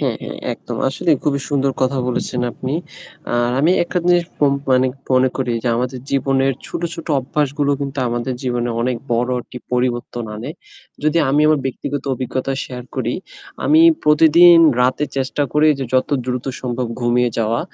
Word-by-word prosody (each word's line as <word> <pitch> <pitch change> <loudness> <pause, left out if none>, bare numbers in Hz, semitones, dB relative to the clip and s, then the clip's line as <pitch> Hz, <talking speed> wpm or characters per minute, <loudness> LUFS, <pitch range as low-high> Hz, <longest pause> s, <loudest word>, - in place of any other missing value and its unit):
হ্যাঁ, - - 0
হ্যাঁ - - -7
একদম। - - -7
আসলেই 150 +3 +1
খুবই 140 -1 +1
সুন্দর 140 -2 +1
কথা 130 +1 +1
বলেছেন 125 0 -2
আপনি। 130 - -4 0.6
আর 120 0 +1
আমি 155 +4 +3
একটা 175 - -2
জিনিস 175 -1 +4 0.2
উম 140 -1 +3 0.2
মানে 130 0 +4 0.3
মনে 130 0 +4
করি 130 -3 -1
যে 125 - 0
আমাদের 125 +2 -2
জীবনের 135 0 +1
ছোট, - - -5
ছোট 165 - -9
অভ্যাসগুলো 145 +1 -1
কিন্তু 140 0 -4
আমাদের 120 +2 -2
জীবনে 120 -2 -1
অনেক 125 +1 0 0.2
বড় 120 +2 +1
একটি 125 - -10
পরিবর্তন 120 -1 -1
আনে। 115 +7 -6 0.5
যদি 155 +2 +2
আমি 145 +2 +3
আমার 155 -2 +3
ব্যক্তিগত 135 +2 -4
অভিজ্ঞতা 130 +2 -3
শেয়ার 125 -1 -8
করি, 125 -2 -1 0.5
আমি 310 +2 +5 0.2
প্রতিদিন 165 +3 +7 0.2
রাতে 130 +4 +2
চেষ্টা 135 +2 -1
করি 150 +1 +4
যে 135 - -2
যত 130 - +2 0.2
দ্রুত 125 -1 -2 0.2
সম্ভব 125 0 -2
ঘুমিয়ে 120 0 +2
যাওয়া 115 +1 0
130 Hz, 165 wpm, -19 LUFS, 125-145 Hz, 0.6 s, প্রতিদিন